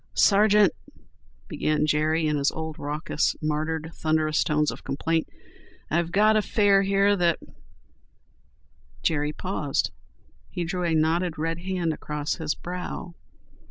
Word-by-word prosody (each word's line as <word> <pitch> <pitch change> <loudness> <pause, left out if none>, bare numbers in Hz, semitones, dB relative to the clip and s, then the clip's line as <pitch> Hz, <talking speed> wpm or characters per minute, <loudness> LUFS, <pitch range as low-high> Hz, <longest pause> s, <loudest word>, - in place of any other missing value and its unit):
"Sargeant," 205 -1 +5 0.7
began 150 0 0
Jerry 155 +2 +1
in 150 -1 +1
his 140 0 +2
old 160 -1 -6
raucous, 150 +1 -1
martyred, 155 +1 -2
thunderous 155 -1 +1
tones 150 0 +1
of - - -10
complaint. 160 +4 -1 0.6
"I've 170 +1 0
got 215 +3 +4
a 215 - +4
fare 200 -1 +3
here 195 +1 +3
that—" 175 -3 +2 1.7
Jerry 150 -2 +1
paused. 150 -4 -2 0.6
He 175 - -3
drew 180 +1 -2
a 165 -1 +1
knotted, 160 +2 +1
red 165 +2 -2
hand 180 -3 -1
across 150 0 -3
his 160 -3 -2
brow. 180 0 -6
160 Hz, 125 wpm, -25 LUFS, 155-180 Hz, 1.7 s, Sargeant